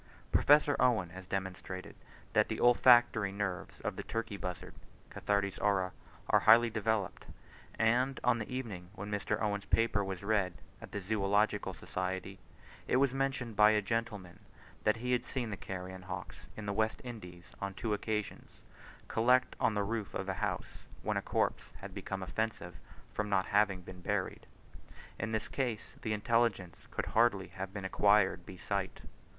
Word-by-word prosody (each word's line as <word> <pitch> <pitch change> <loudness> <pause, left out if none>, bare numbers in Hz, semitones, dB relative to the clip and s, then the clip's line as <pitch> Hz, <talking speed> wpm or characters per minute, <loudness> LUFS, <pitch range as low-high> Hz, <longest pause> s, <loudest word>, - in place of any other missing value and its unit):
Professor 145 0 +5
Owen 115 -9 +3
has 95 0 -10
demonstrated 95 -1 -4 0.4
that - - +4
the - - -2
olfactory 120 -4 +6
nerves 95 -4 -4
of - - -3
the - - -2
turkey 115 -2 -3
buzzard 90 -3 -6 0.4
(Cathartes 100 -1 0
aura) 95 -3 +2 0.4
are - - +5
highly 115 +1 +6
developed, 110 -3 -1 0.5
and 125 +4 +2
on 120 -1 +3
the 110 - -5
evening 105 -9 -5
when 105 +2 -6
Mr. 105 +1 -1
Owen's 100 -2 -1
paper 115 -3 +2
was 95 -1 -5
read 100 -4 +1 0.3
at - - -10
the 105 - -4
Zoological 100 0 +1
Society, 95 +1 -4 0.5
it - - +2
was 135 0 +3
mentioned 135 -4 -1
by 105 +1 +7
a 110 -1 +4
gentleman 105 -4 -3 0.5
that - - +4
he 125 +2 -2
had 125 -1 +2
seen 125 -4 -3
the - - -2
carrion 95 -1 -6
hawks 90 -1 -7
in 110 - -6
the 100 - -1
West 110 +1 0
Indies 90 -8 -9
on 100 -1 -3
two 110 +1 -1
occasions 105 0 -4 0.5
collect 125 +3 +3
on 110 - +2
the 105 - +1
roof 110 0 -3
of 95 - -3
a 95 - 0
house, 95 -5 -3 0.2
when - - 0
a - - +1
corpse - - 0
had - - -9
become 95 -1 -4
offensive 100 -3 -3 0.4
from 105 0 -2
not 95 -2 +2
having 100 -3 +2
been 90 0 -11
buried, 100 0 -2 0.7
in 110 +3 -2
this 110 -1 -1
case, 120 -5 -3
the 110 - -2
intelligence 105 -4 0
could - - -3
hardly 100 -6 +2
have 95 0 -6
been 100 -2 -6
acquired 95 -2 +3
by 95 - -8
sight. 100 +1 -3
105 Hz, 165 wpm, -33 LUFS, 95-115 Hz, 0.7 s, by